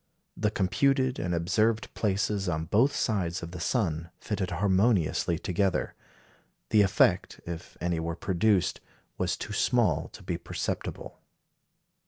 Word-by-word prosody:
The 105 - +1
computed 130 +7 +1
and 90 -1 -1
observed 110 +7 +1
places 100 -1 0
on 80 -1 -1
both 115 - +3
sides 90 -6 -1
of 85 - -6
the 90 - -7
sun 85 -6 -1
fitted 100 -4 -2
harmoniously 95 -2 +2
together. 90 +2 0 0.8
The 110 - +6
effect, 100 - +2
if 85 -1 -7
any 85 0 -1
were 85 0 -3
produced, 95 +2 +1 0.4
was - - 0
too - - -6
small - - +2
to - - -11
be - - -3
perceptible. - - -4
95 Hz, 130 wpm, -28 LUFS, 85-105 Hz, 0.8 s, The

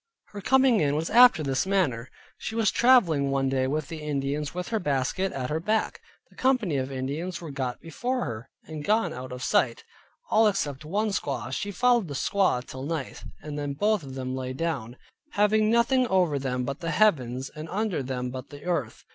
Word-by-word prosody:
Her 205 - -8
coming 265 +1 +4
in 145 -2 +1
was 160 +2 -2
after 240 -8 +7
this 135 +5 0
manner: 145 -12 0 0.3
she 220 - -5
was 225 -3 +2
traveling 175 - +4
one 135 -1 +1
day 130 -1 +1
with 150 +1 -2
the 160 0 -7
Indians, 145 0 -2
with 180 0 -5
her 225 - 0
basket 150 +5 -1
at 130 +1 -4
her 155 - 0
back; 215 +6 -1 0.3
the - - -21
company 245 - +1
of 130 0 -2
Indians 145 +7 -3
were 165 -4 -7
got 130 -3 -3
before 245 - -3
her, 115 -2 -6
and 155 -2 -7
gone 215 +7 +1
out 125 +1 -7
of 125 +1 -6
sight, 120 -3 +1 0.5
all 220 0 +5
except 150 -9 -1
one 210 +7 0
squaw; 135 - -3
she 205 - -2
followed 240 0 +2
the 140 - -6
squaw 160 -6 +1
till 130 - -8
night, 150 0 -4 0.2
and 150 -1 -5
then 145 -1 -3
both 210 +7 +1
of 135 -3 -9
them 130 -1 -4
lay 130 0 -4
down, 130 -6 -3 0.4
having 215 +1 +3
nothing 240 +2 +3
over 180 -8 +2
them 125 -2 -2
but 140 +3 -4
the 165 -2 -3
heavens 135 - +1
and 155 +1 -8
under 205 -5 -1
them 125 -1 -3
but 130 +1 -7
the 145 -1 -11
earth. 170 -10 -3
150 Hz, 200 wpm, -26 LUFS, 135-205 Hz, 0.5 s, after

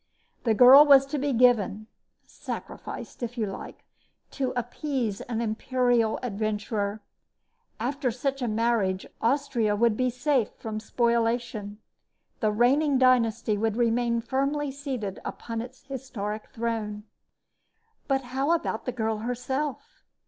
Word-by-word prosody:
The 225 -2 +3
girl 255 +6 +10
was 275 -2 +7
to 285 +1 -3
be 285 +1 0
given 230 -4 +3 0.4
sacrificed, - - -8
if 240 +1 -4
you 220 - 0
like 195 -1 -8 0.5
to 265 -3 -2
appease 245 -3 -2
an 235 -2 -3
imperial 235 0 +1
adventurer. 210 -1 -2 0.8
After 260 +3 -1
such 270 +3 -2
a 245 - 0
marriage, 215 -4 0 0.2
Austria 235 -4 +1
would 230 0 +3
be 255 +2 +1
safe 250 -1 +1
from 220 -1 -5
spoliation. 230 -2 -1 0.6
The 215 -3 +2
reigning 270 +6 +3
dynasty 230 -4 +3
would 220 -1 0
remain 235 0 +1
firmly 275 +4 -1
seated 260 -8 -5
upon 230 -1 -5
its 250 +2 -10
historic 225 -6 -5
throne. 220 -2 -3 1.0
But 270 -2 +1
how 275 +5 +2
about 320 -9 -2
the 250 - -1
girl 220 -3 -2
herself? 265 - -4
235 Hz, 125 wpm, -27 LUFS, 220-265 Hz, 1.0 s, girl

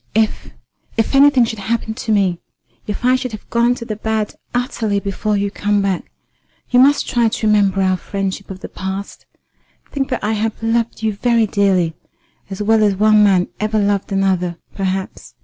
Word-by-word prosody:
If 220 -1 0 0.5
if 225 - 0
anything 275 -3 +6
should 225 -1 -5
happen 220 +2 -2
to 225 -1 -4
me 190 -5 +2 0.5
if 210 +3 -4
I 255 +1 +5
should 255 -2 -3
have 215 - -9
gone 235 +1 +3
to 235 - -8
the 215 -2 -4
bad 220 0 -2 0.2
utterly 240 -5 -1
before 200 +2 -2
you 200 0 -1
come 205 0 0
back, 195 -2 -2 0.6
you 245 - +5
must 280 +3 +4
try 240 -2 +2
to 220 - -3
remember 200 -2 +3
our 185 0 +2
friendship 195 +1 -4
of 190 -1 -8
the - - -6
past. 190 +1 -6 0.6
Think 275 -2 -2
that 255 - -3
I 210 - 0
have 220 +1 -2
loved 230 0 -1
you 220 -1 +1
very 230 +2 +2
dearly 195 -5 +1 0.6
as 195 +1 -4
well 220 +1 +3
as 205 -2 +3
one 215 +1 +5
man 190 -3 +3
ever 215 +1 0
loved 205 -1 0
another, 185 -3 0 0.2
perhaps." 190 -1 -4
210 Hz, 185 wpm, -18 LUFS, 195-225 Hz, 0.6 s, anything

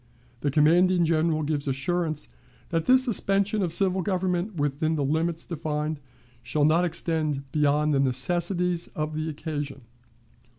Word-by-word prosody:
The 145 - -1
commanding 170 +5 +4
General 160 -1 +1
gives 145 -1 -2
assurance 155 +3 -1 0.4
that 165 -1 -1
this 255 0 +5
suspension 200 -3 +1
of 175 -3 -1
civil 190 +2 +2
government 185 +1 -1
within 145 +1 0
the 145 - -1
limits 160 +3 -1
defined 155 -2 -3 0.4
shall 135 +6 0
not 160 +3 +3
extend 155 -4 -1
beyond 150 0 +2
the 140 - +2
necessities 175 +6 0
of 155 0 -3
the 155 +1 -2
occasion. 145 -3 -5
160 Hz, 135 wpm, -26 LUFS, 150-175 Hz, 0.4 s, this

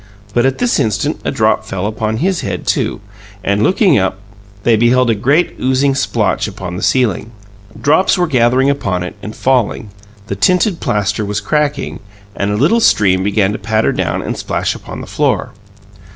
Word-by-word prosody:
But 120 +2 +3
at 135 - -1
this 245 -1 +1
instant 105 -3 -1
a - - -1
drop - - +1
fell 95 0 -4
upon 110 +1 -2
his 180 +6 0
head, - - -4
too, - - -1 0.4
and, 100 +1 0
looking 185 - +3
up, 95 0 -1 0.5
they 115 - +4
beheld 120 +2 +3
a - - +3
great 140 - +1
oozing 130 +2 +2
splotch 135 - 0
upon 90 -1 -6
the 90 - -5
ceiling. 115 -5 +1 0.5
Drops 160 +7 +3
were 180 - +2
gathering 130 -2 +2
upon 95 -11 -1
it 90 - -6
and 105 +2 -7
falling; 125 -5 0 0.3
the 100 - -4
tinted 180 - +2
plaster 105 +1 -1
was 105 0 -2
cracking, 145 +5 -1 0.4
and 100 - -1
a 105 - 0
little 160 - +3
stream 95 - +3
began 100 0 +1
to 105 - -4
patter 110 +1 +1
down - - -2
and - - -3
splash - - -2
upon - - -9
the - - -7
floor. - - -1
115 Hz, 180 wpm, -15 LUFS, 105-140 Hz, 0.5 s, they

